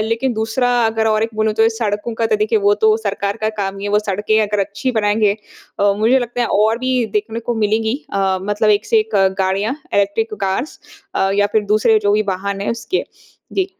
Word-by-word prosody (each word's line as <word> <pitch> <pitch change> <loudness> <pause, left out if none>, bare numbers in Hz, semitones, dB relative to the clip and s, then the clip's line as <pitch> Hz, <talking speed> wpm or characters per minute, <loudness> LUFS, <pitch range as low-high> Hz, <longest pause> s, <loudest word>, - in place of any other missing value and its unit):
लेकिन 235 +3 0
दूसरा 225 +3 0 0.2
अगर 225 0 0
और 215 0 +2
एक 225 - -1
बोलूँ 215 0 0
तो 225 - +5
सड़कों 210 +1 -2
का 225 0 0
तो - - +1
देखिए 440 0 +1
वो 410 - +5
तो 435 0 +5
सरकार 200 +1 -2
का - - +2
काम 195 0 -3
हीं 200 - -5
है - - -3
वो 210 - +4
सड़कें 210 +3 +1
अगर 210 -1 -1
अच्छी 205 +6 -3
बनाएँगे 205 0 +2 0.4
अ, 200 0 +4
मुझे 235 +5 +4
लगता 245 0 -4
है 235 - +1 0.2
और 220 +2 +2
भी 255 -1 0
देखने 220 +2 -5
को 240 - +1
मिलेंगी 220 +3 0 0.2
अ, 190 -1 +1
मतलब 205 +2 +1
एक 205 +1 +2
से 455 - +3
एक 430 +1 -3 0.2
गाड़ियाँ 195 +6 0 0.2
इलेक्ट्रिक 205 +2 0
कार्स 195 +10 -2 0.6
या 205 0 +3
फ़िर 215 0 +1
दूसरे 215 +2 +3
जो 205 - +2
भी 215 - +2
वाहन 195 +1 -2
हैं 200 - -1
उसके। 235 +11 -2 0.5
जी। 380 - +1
215 Hz, 215 wpm, -18 LUFS, 205-230 Hz, 0.6 s, तो